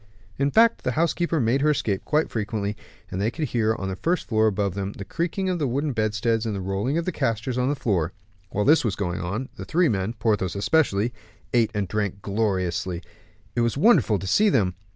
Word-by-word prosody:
In 140 Hz, 0 st, +2 dB
fact, 230 Hz, +8 st, +4 dB
the 130 Hz, -, 0 dB
housekeeper 170 Hz, +1 st, +1 dB
made 125 Hz, +2 st, +2 dB
her 150 Hz, -, +3 dB
escape 105 Hz, -9 st, 0 dB
quite 155 Hz, +1 st, +1 dB
frequently, 105 Hz, -1 st, -2 dB, 0.4 s
and 95 Hz, -, -2 dB
they 105 Hz, -, +2 dB
could 150 Hz, +3 st, -3 dB
hear, 110 Hz, -2 st, +1 dB
on 95 Hz, -, -4 dB
the 95 Hz, -, -3 dB
first 170 Hz, -, -1 dB
floor 110 Hz, -2 st, +3 dB
above 100 Hz, -2 st, 0 dB
them, 100 Hz, +1 st, -3 dB
the 100 Hz, -, -8 dB
creaking 175 Hz, -, -2 dB
of 180 Hz, -2 st, 0 dB
the 145 Hz, -, +1 dB
wooden 140 Hz, +3 st, -1 dB
bedsteads 110 Hz, +1 st, 0 dB
and 110 Hz, -3 st, -2 dB
the -, -, -3 dB
rolling 95 Hz, -, -1 dB
of 170 Hz, -, -1 dB
the 185 Hz, -, 0 dB
castors 115 Hz, -3 st, -1 dB
on 125 Hz, +1 st, +1 dB
the 145 Hz, -, +1 dB
floor. 95 Hz, -, 0 dB, 0.4 s
While 105 Hz, +2 st, -1 dB
this 155 Hz, +3 st, +5 dB
was 110 Hz, -6 st, 0 dB
going 90 Hz, -3 st, -2 dB
on, 110 Hz, +10 st, -3 dB
the -, -, -6 dB
three 170 Hz, +1 st, +2 dB
men, 100 Hz, 0 st, -1 dB
Porthos 105 Hz, -5 st, 0 dB
especially, 115 Hz, -1 st, +2 dB, 0.4 s
ate 115 Hz, -3 st, +4 dB
and 100 Hz, -2 st, 0 dB
drank 100 Hz, -1 st, -2 dB
gloriously, 95 Hz, -4 st, -1 dB, 0.5 s
it 120 Hz, -, +2 dB
was 115 Hz, +2 st, 0 dB
wonderful 150 Hz, -, +4 dB
to 95 Hz, -, -6 dB
see 210 Hz, -, +4 dB
them. 100 Hz, -, +2 dB
110 Hz, 215 wpm, -24 LUFS, 100-140 Hz, 0.5 s, this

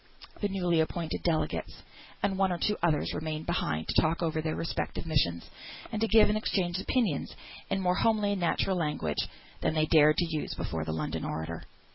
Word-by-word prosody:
The 205 Hz, -, +1 dB
newly 180 Hz, -4 st, +1 dB
appointed 160 Hz, +1 st, -1 dB
delegates, 165 Hz, -3 st, -1 dB, 0.4 s
and 195 Hz, -, +2 dB
one 190 Hz, -1 st, +2 dB
or 175 Hz, -, 0 dB
two 210 Hz, +5 st, +1 dB
others, 160 Hz, -3 st, +1 dB
remained 155 Hz, 0 st, -3 dB
behind 80 Hz, -, -1 dB
to -, -, +3 dB
talk 165 Hz, +2 st, 0 dB
over 160 Hz, -1 st, 0 dB
their 155 Hz, 0 st, -2 dB
respective 165 Hz, -, -3 dB
missions, 85 Hz, -, 0 dB, 0.4 s
and 215 Hz, -1 st, -3 dB
to 225 Hz, -, +3 dB
give 220 Hz, -1 st, +6 dB
and 210 Hz, -, +1 dB
exchange 185 Hz, -4 st, 0 dB
opinions 200 Hz, -, 0 dB, 0.3 s
in -, -, 0 dB
more 180 Hz, -1 st, +2 dB
homely 215 Hz, -2 st, +2 dB
and 200 Hz, -2 st, -1 dB
natural 180 Hz, +2 st, +1 dB
language 150 Hz, -, -1 dB, 0.3 s
than -, -, 0 dB
they 155 Hz, 0 st, +3 dB
dared 155 Hz, -1 st, +5 dB
to 175 Hz, -, +3 dB
use 150 Hz, -, -3 dB
before 80 Hz, -1 st, -3 dB
the 80 Hz, -, -2 dB
London 80 Hz, -1 st, -3 dB
orator. 80 Hz, +1 st, -4 dB
165 Hz, 190 wpm, -29 LUFS, 155-190 Hz, 0.4 s, give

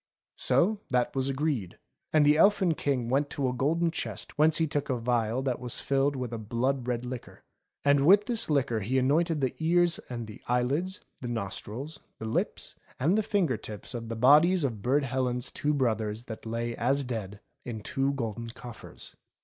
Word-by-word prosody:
So 205 Hz, +4 st, +3 dB
that 125 Hz, 0 st, 0 dB
was 135 Hz, 0 st, 0 dB
agreed; 135 Hz, -, -2 dB, 0.3 s
and 155 Hz, -2 st, +4 dB
the 150 Hz, +1 st, +6 dB
Elfin 190 Hz, 0 st, +4 dB
King 135 Hz, -6 st, -1 dB
went 140 Hz, +4 st, +1 dB
to 140 Hz, -2 st, -1 dB
a 125 Hz, -, -1 dB
golden 165 Hz, +6 st, +1 dB
chest -, -, -3 dB
whence 155 Hz, +1 st, +4 dB
he 165 Hz, -, +3 dB
took 145 Hz, -1 st, -2 dB
a 125 Hz, -2 st, 0 dB
phial 120 Hz, +1 st, 0 dB
that 130 Hz, -2 st, -1 dB
was 125 Hz, -1 st, 0 dB
filled 140 Hz, +1 st, +1 dB
with 125 Hz, -3 st, -4 dB
a 115 Hz, -, -3 dB
blood 120 Hz, +4 st, -1 dB
red 120 Hz, 0 st, -1 dB
liquor. 125 Hz, -1 st, -8 dB, 0.4 s
And 140 Hz, 0 st, +4 dB
with 200 Hz, +3 st, +7 dB
this 230 Hz, -6 st, 0 dB
liquor 135 Hz, -6 st, +1 dB
he 115 Hz, +6 st, -1 dB
anointed 150 Hz, +4 st, +2 dB
the 130 Hz, -2 st, 0 dB
ears 170 Hz, +1 st, +3 dB
and 120 Hz, -2 st, -4 dB
the 105 Hz, -1 st, -11 dB
eyelids, 140 Hz, +11 st, 0 dB, 0.2 s
the 125 Hz, -, -4 dB
nostrils, 120 Hz, +6 st, -5 dB, 0.2 s
the 110 Hz, -, -7 dB
lips, 110 Hz, -, -2 dB, 0.3 s
and 165 Hz, +9 st, +3 dB
the 220 Hz, -, +3 dB
finger 190 Hz, -, +1 dB
tips 105 Hz, +1 st, -8 dB
of 115 Hz, -2 st, -5 dB
the 115 Hz, -, -3 dB
bodies 150 Hz, +9 st, +5 dB
of 115 Hz, -7 st, -2 dB
Burd 135 Hz, +6 st, +2 dB
Helen's 125 Hz, -1 st, -1 dB
two 150 Hz, -, -1 dB
brothers 110 Hz, -5 st, 0 dB
that 115 Hz, -2 st, -8 dB
lay 115 Hz, +1 st, -2 dB
as 140 Hz, +1 st, +1 dB
dead 105 Hz, -5 st, -5 dB, 0.2 s
in 110 Hz, -3 st, -6 dB
two 135 Hz, +5 st, 0 dB
golden 115 Hz, -3 st, -4 dB
coffers. 120 Hz, 0 st, -10 dB
130 Hz, 190 wpm, -28 LUFS, 120-150 Hz, 0.4 s, with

